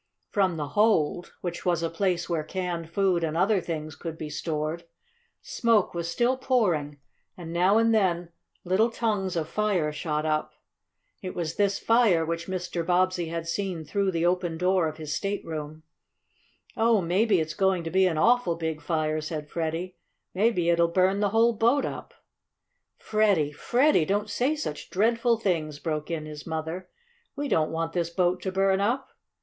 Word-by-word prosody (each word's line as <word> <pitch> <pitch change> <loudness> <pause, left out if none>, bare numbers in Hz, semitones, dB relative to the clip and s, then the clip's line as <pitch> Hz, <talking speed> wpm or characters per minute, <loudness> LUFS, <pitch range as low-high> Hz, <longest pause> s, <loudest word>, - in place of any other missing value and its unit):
From 190 -4 +1
the 145 -2 -3
hold, 175 -5 +1
which 175 -1 -4
was 170 -2 +1
a 165 - 0
place 180 0 0
where 165 -3 -1
canned 175 -1 -4
food 185 -1 +1
and 160 0 -1
other 195 +2 +3
things 155 -3 -5
could 165 -2 -6
be 150 -2 -6
stored, 155 +2 -3 0.6
smoke 230 -4 +1
was 170 -1 -3
still 245 +8 +1
pouring, 180 - 0 0.4
and 170 -2 -7
now 185 +5 +4
and 230 0 +3
then 175 -5 +1 0.3
little 190 +6 +2
tongues 210 -5 -1
of 160 -2 -1
fire 190 -5 0
shot 150 0 -2
up. 155 -1 -1 0.7
It 185 -3 -6
was 165 -2 -3
this 200 -1 +1
fire 225 -8 +3
which 165 +1 -3
Mr. 180 -2 -3
Bobbsey 180 0 +1
had 165 0 -4
seen 180 -2 -3
through 200 +5 0
the 170 -2 0
open 175 -2 0
door 180 -1 +2
of 155 0 -6
his 155 -2 -5
stateroom. 155 -5 -4 0.9
"Oh, 225 -1 +3
maybe 190 +3 +2
it's 155 -1 -2
going 190 0 +1
to 165 - -5
be 190 +1 +4
an 165 -3 -1
awful 240 -1 +3
big 160 -2 -3
fire!" 155 -2 -1
said 155 -1 -5
Freddie. 170 +2 -3 0.4
"Maybe 190 -3 +2
it'll 170 0 +3
burn 185 +3 +2
the 205 -1 +2
whole 225 +3 +3
boat 235 +6 +2
up!" - - -7 0.8
"Freddie, 200 -9 +2
Freddie! 245 - +2
Don't 205 +3 -1
say 255 +8 +1
such 220 - -5
dreadful 230 +4 +2
things!" 165 -8 -1
broke 155 -1 -3
in 160 -2 -3
his 150 0 -9
mother. 160 +3 -4 0.5
"We 290 0 -3
don't 155 - +2
want 165 0 -3
this 170 -2 -1
boat 180 +1 0
to 190 - -3
burn 195 0 +2
up." 245 +6 -1
175 Hz, 170 wpm, -26 LUFS, 160-200 Hz, 0.9 s, now